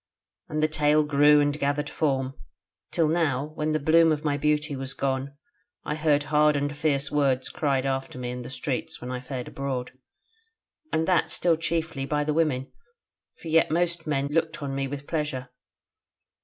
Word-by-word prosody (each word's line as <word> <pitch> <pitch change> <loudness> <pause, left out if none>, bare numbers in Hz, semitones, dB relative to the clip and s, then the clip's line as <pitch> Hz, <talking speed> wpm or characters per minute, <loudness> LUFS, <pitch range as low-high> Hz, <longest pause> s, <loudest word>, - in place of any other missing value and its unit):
And 155 0 -1
the - - +5
tale 150 0 +3
grew 150 0 +5
and 145 +1 0
gathered 145 +1 0
form, 135 -4 -1 0.6
till 165 -3 +2
now, 150 -3 0
when 155 0 -1
the 155 - +1
bloom 160 +2 +5
of 150 -1 -1
my 145 -2 +1
beauty 150 +1 0
was 135 0 -3
gone, 135 +1 -2 0.5
I - - -2
heard 150 -1 +2
hard 150 0 +5
and 145 +1 -1
fierce 145 -2 0
words 135 -3 +1
cried 135 -3 0
after 135 -1 -2
me 125 -1 -4
in 125 0 -5
the 125 - -8
streets 130 0 -3
when 125 - -6
I 125 - -3
fared 125 -1 -6
abroad, 135 -2 -4 1.0
and 160 +1 +1
that 180 -2 +3
still 170 -2 +2
chiefly 160 -4 -2
by 150 0 0
the 150 0 0
women: 150 -5 0 0.7
for 165 - -5
yet 165 +1 +4
most 170 0 0
men 140 -2 0
looked 165 0 0
on 140 -1 -3
me 135 0 -1
with 140 +1 -6
pleasure. 150 -6 -3
145 Hz, 180 wpm, -26 LUFS, 135-155 Hz, 1.0 s, the